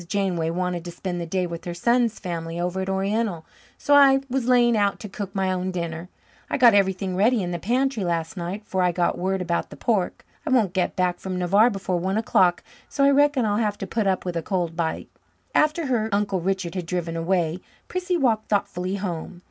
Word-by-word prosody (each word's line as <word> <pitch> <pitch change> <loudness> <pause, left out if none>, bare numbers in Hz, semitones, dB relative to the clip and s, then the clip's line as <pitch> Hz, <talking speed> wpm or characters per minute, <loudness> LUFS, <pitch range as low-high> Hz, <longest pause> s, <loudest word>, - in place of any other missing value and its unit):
Janeway 180 -4 0
wanted 180 0 -2
to 175 - -5
spend 175 0 -4
the 170 - -5
day 185 +2 0
with 170 -1 -7
her 175 -1 -4
son's 235 +4 +2
family 170 -2 -5
over 180 +2 -2
at 190 - -3
Oriental, 195 -2 -1 0.3
so 290 - +1
I 275 -1 +7
was 255 -2 -1
laying 240 -2 +4
out 205 -2 +1
to 215 - -6
cook 200 -1 -7
my 190 -1 +1
own 185 0 -2
dinner. 170 -1 -4 0.4
I - - 0
got 245 -4 +7
everything 190 -1 +1
ready 215 +3 +3
in 175 - -3
the 175 - -3
pantry 250 +3 0
last 170 +2 -2
night, 190 +4 -5
'fore 190 - -1
I 180 -1 +3
got 175 0 0
word 190 +1 -1
about 170 -1 -1
the - - -10
pork. 205 -6 -1 0.2
I 315 - -4
won't 225 -9 +2
get 185 -1 0
back 180 -1 0
from 185 -1 -4
Navarre 200 +6 +4
before 195 -4 -2
one 190 +4 -1
o'clock, 180 -5 +2 0.3
so 275 - 0
I 280 - +6
reckon 285 -3 +3
I'll 205 -1 +1
have 210 -2 0
to - - -5
put 210 +2 -1
up 190 -1 0
with 180 -1 -3
a 165 - -1
cold 175 -3 -2
bite." 165 -2 -3 0.4
After 305 +2 +2
her 235 -5 0
Uncle 200 -2 0
Richard 190 -1 -2
had 180 -3 -4
driven 170 -2 -2
away, 170 0 0 0.3
Prissy 360 -1 -1
walked 230 -7 +1
thoughtfully 195 -2 -1
home. 180 -2 -5
190 Hz, 220 wpm, -24 LUFS, 175-220 Hz, 0.4 s, I